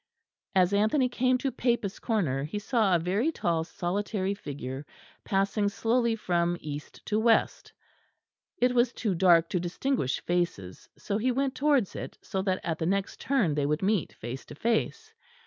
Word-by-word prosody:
As 185 Hz, 0 st, +4 dB
Anthony 220 Hz, +6 st, +3 dB
came 255 Hz, +1 st, +2 dB
to 265 Hz, +1 st, -2 dB
Papists' 235 Hz, -5 st, -1 dB
Corner 165 Hz, -, 0 dB
he 155 Hz, +8 st, -4 dB
saw 210 Hz, -3 st, +2 dB
a -, -, +3 dB
very 200 Hz, -, 0 dB
tall 170 Hz, -, 0 dB
solitary 195 Hz, +3 st, -2 dB
figure 140 Hz, -7 st, -6 dB, 0.4 s
passing 200 Hz, +1 st, +1 dB
slowly 230 Hz, +2 st, +1 dB
from 175 Hz, -4 st, 0 dB
east 145 Hz, -1 st, -8 dB
to 215 Hz, -, 0 dB
west; 225 Hz, 0 st, +2 dB, 0.9 s
it 250 Hz, -6 st, +2 dB
was 240 Hz, 0 st, +3 dB
too 210 Hz, -5 st, -1 dB
dark 170 Hz, -2 st, +5 dB
to 180 Hz, -, 0 dB
distinguish 175 Hz, -, -1 dB
faces; 170 Hz, -, -2 dB
so 205 Hz, 0 st, -2 dB
he 255 Hz, +3 st, +1 dB
went 270 Hz, +1 st, 0 dB
towards 280 Hz, -7 st, +2 dB
it, -, -, -6 dB
so 190 Hz, -, -3 dB
that 190 Hz, -1 st, 0 dB
at 165 Hz, -1 st, -2 dB
the 160 Hz, -, -1 dB
next 195 Hz, +1 st, -1 dB
turn 230 Hz, -, +1 dB
they 145 Hz, -1 st, 0 dB
would 150 Hz, +4 st, -1 dB
meet 200 Hz, -3 st, +1 dB
face 120 Hz, +4 st, -7 dB
to -, -, -11 dB
face. 235 Hz, -, -1 dB
200 Hz, 165 wpm, -28 LUFS, 170-235 Hz, 0.9 s, dark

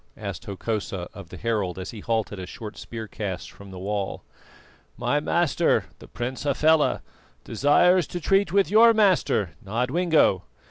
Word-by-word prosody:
asked 100 Hz, +2 st, -6 dB
Hokosa 100 Hz, -3 st, -4 dB
of 100 Hz, -4 st, -11 dB
the -, -, -9 dB
herald 105 Hz, -6 st, -1 dB
as 95 Hz, +1 st, -6 dB
he 110 Hz, -, -9 dB
halted 110 Hz, -2 st, -2 dB
a 90 Hz, -, -6 dB
short 110 Hz, -2 st, -8 dB
spear 110 Hz, -2 st, -7 dB
cast 100 Hz, -4 st, -5 dB
from 100 Hz, 0 st, -13 dB
the 95 Hz, -, -9 dB
wall. 100 Hz, +1 st, -3 dB, 0.7 s
"My 145 Hz, -, +1 dB
master, 165 Hz, -, +1 dB
the -, -, -13 dB
Prince 125 Hz, +2 st, -5 dB
Hafela, 150 Hz, +2 st, +2 dB, 0.4 s
desires 175 Hz, +4 st, +3 dB
to 175 Hz, -, -5 dB
treat 195 Hz, +4 st, +2 dB
with 195 Hz, 0 st, +2 dB
your 230 Hz, +2 st, +7 dB
master, 185 Hz, -, +2 dB
Nodwengo. 125 Hz, -, +2 dB
115 Hz, 150 wpm, -25 LUFS, 100-165 Hz, 0.7 s, your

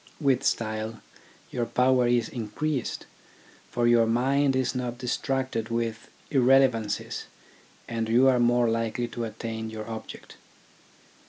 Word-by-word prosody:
With 135 Hz, -3 st, +2 dB
style 110 Hz, 0 st, -1 dB, 0.5 s
your 120 Hz, -2 st, -2 dB
power 125 Hz, +1 st, +3 dB
is 120 Hz, -2 st, +2 dB
increased, 125 Hz, +5 st, -3 dB, 0.6 s
for 120 Hz, -1 st, 0 dB
your 120 Hz, -1 st, +5 dB
mind 135 Hz, +4 st, +2 dB
is 130 Hz, -1 st, 0 dB
not 125 Hz, -2 st, -3 dB
distracted 125 Hz, -2 st, -2 dB
with 115 Hz, -1 st, -3 dB, 0.2 s
irrelevancies, 130 Hz, -5 st, +2 dB, 0.6 s
and 115 Hz, -1 st, -2 dB
you 125 Hz, +4 st, +5 dB
are 130 Hz, -2 st, +4 dB
more 120 Hz, 0 st, +3 dB
likely 115 Hz, +1 st, -1 dB
to 120 Hz, 0 st, -4 dB
attain 110 Hz, 0 st, -5 dB
your 110 Hz, 0 st, -7 dB
object. 110 Hz, -1 st, -8 dB
120 Hz, 120 wpm, -27 LUFS, 115-130 Hz, 0.6 s, your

